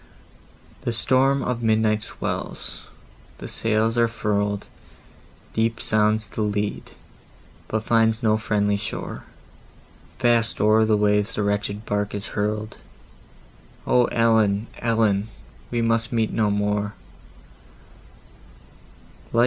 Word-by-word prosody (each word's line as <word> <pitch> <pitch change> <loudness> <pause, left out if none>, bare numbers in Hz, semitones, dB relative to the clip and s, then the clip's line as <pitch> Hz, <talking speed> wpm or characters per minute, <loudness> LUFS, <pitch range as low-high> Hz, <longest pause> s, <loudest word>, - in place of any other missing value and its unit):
The 120 - -2
storm 130 +3 +2
of 125 -1 -2
midnight 110 -1 +2
swells, - - -5 0.5
the - - -8
sails 115 +1 0
are 115 - +4
furl'd, 105 -3 -1 0.9
Deep 115 +1 0
sounds 110 0 +1
the 110 - -5
lead, 105 -1 -2 0.8
but 110 0 -2
finds 115 +1 +2
no 110 -1 +4
friendly 105 -2 +1
shore, 100 - -5 0.9
Fast 120 -2 +2
o'er 110 +1 +4
the 110 -1 +3
waves 105 +1 +1
the 105 - 0
wretched 105 +1 -2
bark 105 0 -1
is 100 +1 -5
hurl'd, 105 +1 -2 1.1
"O 125 -1 +4
Ellen, 110 -3 +2
Ellen! 110 -3 +1 0.4
we 120 -1 0
must 115 +1 +1
meet 115 -2 0
no 110 -2 +2
more!" 105 0 -1
110 Hz, 110 wpm, -23 LUFS, 105-115 Hz, 1.1 s, are